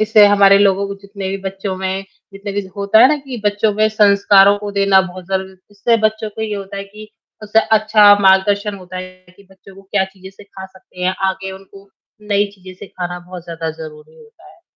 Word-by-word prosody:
इससे 215 -1 +5
हमारे 200 -1 +5
लोगों 200 0 +2
को 200 - -5
जितने 200 -1 -7
भी 195 - -3
बच्चों 195 0 -5
में 190 +1 -3 0.3
जितने 200 +1 -7
भी 205 - -2 0.2
होता 200 +2 +2
है 255 - +8
ना 300 - +1
कि 270 -5 -8
बच्चों 205 +1 +1
में 215 +1 +2
संस्कारों 200 -1 +4
को 205 0 -6
देना 195 -1 +3
बहुत 185 -1 -8
ज़रूरी 190 0 -2
है। 190 - -19
इससे 205 +3 +1
बच्चों 220 0 -4
को 220 +1 -7
ये 215 -1 -3
होता 200 0 -7
है 195 - -5
कि 210 +2 -13 0.3
उससे 215 +1 +2 0.2
अच्छा 210 -1 +5
मार्गदर्शन 200 +2 +2
होता 185 -1 -11
है 185 0 -11
कि 200 - -18
बच्चों 190 0 -17
को 195 - -15
क्या 195 0 -1
चीज़ें 190 0 -14
सिखा 195 0 -12
सकते 190 -1 -17
हैं, 185 +1 0
आगे 190 0 -5
उनको 195 +1 -15 0.4
नई 205 0 +2
चीज़ें 185 -1 -13
सिखाना 180 -2 -7
बहुत 180 -1 -11
ज़्यादा 165 -1 -5
ज़रूरी 150 -1 -12
होता 455 -1 -19
है। - - -24
195 Hz, 210 wpm, -17 LUFS, 190-205 Hz, 0.4 s, है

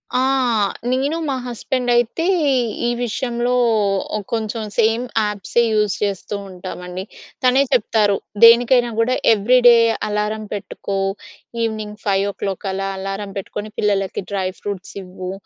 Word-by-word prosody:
ఆ! - - +3 0.7
నేను 275 +5 0
మా - - 0
హస్బెండ్ 245 +1 -2
అయితే 240 +8 +1 0.6
ఈ - - +2 0.2
విషయంలో 240 +1 -1 0.6
ఓ - - +1 0.2
కొంచెం 220 0 -2
సేమ్ 225 +1 +3 0.2
యాప్సే 210 +3 0
యూస్ 210 -2 +1
చేస్తూ 200 0 -2
ఉంటామండి. 180 0 -7 0.4
తనే 255 +2 +5
చెప్తారు. 210 -3 +2 0.3
దేనికైనా 240 +1 +6
కూడా 245 +3 +2 0.2
ఎవ్రి 225 +4 +3
డే 240 - +9 0.3
అలారం 210 +1 -2
పెట్టుకో, 200 -1 -5 0.7
ఈవెనింగ్ 215 -2 -3
5:00 195 -1 -1
అలా 195 +1 -2
అలారం 195 +1 -4
పెట్టుకొని 210 +2 -5
పిల్లలకి 195 -2 0
డ్రై 190 -2 -1
ఫ్రూట్స్ 200 -2 -6
ఇవ్వు 185 0 -7
210 Hz, 120 wpm, -20 LUFS, 195-240 Hz, 0.7 s, డే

